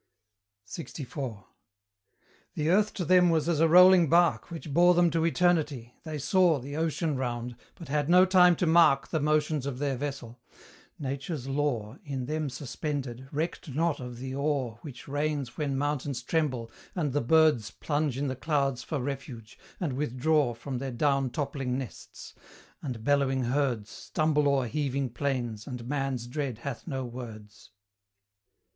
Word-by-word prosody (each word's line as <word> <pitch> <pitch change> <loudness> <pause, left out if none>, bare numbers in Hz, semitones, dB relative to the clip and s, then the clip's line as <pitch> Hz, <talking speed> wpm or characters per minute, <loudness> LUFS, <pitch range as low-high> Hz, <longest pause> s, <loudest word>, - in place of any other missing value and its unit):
LXIV. 130 - -6 1.1
The 155 +1 0
Earth 210 +3 +3
to 180 - -2
them 180 +1 +5
was 160 -2 +1
as 170 -3 +1
a 165 - +5
rolling 180 -1 +7
bark 170 0 +3
Which 165 -3 -7
bore 175 +3 +6
them 175 -1 +4
to 165 -1 +1
Eternity; 155 -8 +1
they 155 -2 -5
saw 175 +2 +3
The 140 +2 -7
Ocean 160 -1 -1
round, 120 -2 -3 0.2
but 165 - -11
had 145 +1 0
no 180 +1 +7
time 180 -2 +6
to 180 - 0
mark 160 -4 +4
The 160 - 0
motions 150 -1 +1
of 135 -3 -4
their 140 0 -1
vessel: 130 -3 -6 0.6
Nature's 140 0 -4
law, 135 -5 -1
In 135 -3 -4
them 155 +1 -2
suspended, 135 -1 -5
recked 155 -1 -3
not 165 0 +1
of 125 -1 -7
the 130 +1 -6
awe 140 -5 -1
Which 135 -5 -10
reigns 145 -3 -2
when 140 -3 -2
mountains 140 -3 -2
tremble, 130 -7 -1 0.2
and 150 -7 -1
the 145 - +1
birds 150 -5 +4
Plunge 145 -3 -2
in 140 +1 -1
the 130 - -2
clouds 140 -2 0
for 155 - -3
refuge, 125 -4 -6 0.2
and 160 -8 -2
withdraw 135 0 +1
From 125 +2 -5
their 135 +1 -3
down 135 +1 +1
toppling 135 -1 -2
nests; 135 -3 -8 0.5
and 125 -6 -5
bellowing 135 -1 +2
herds 125 -4 -1
Stumble 150 -2 0
o'er 135 -2 +2
heaving 140 -1 -2
plains, 120 -5 -3
and 125 -3 -6
man's 135 -3 -2
dread 130 -2 -3
hath 125 +4 -6
no 135 -4 -3
words. 110 -4 -10
140 Hz, 155 wpm, -28 LUFS, 125-155 Hz, 1.1 s, rolling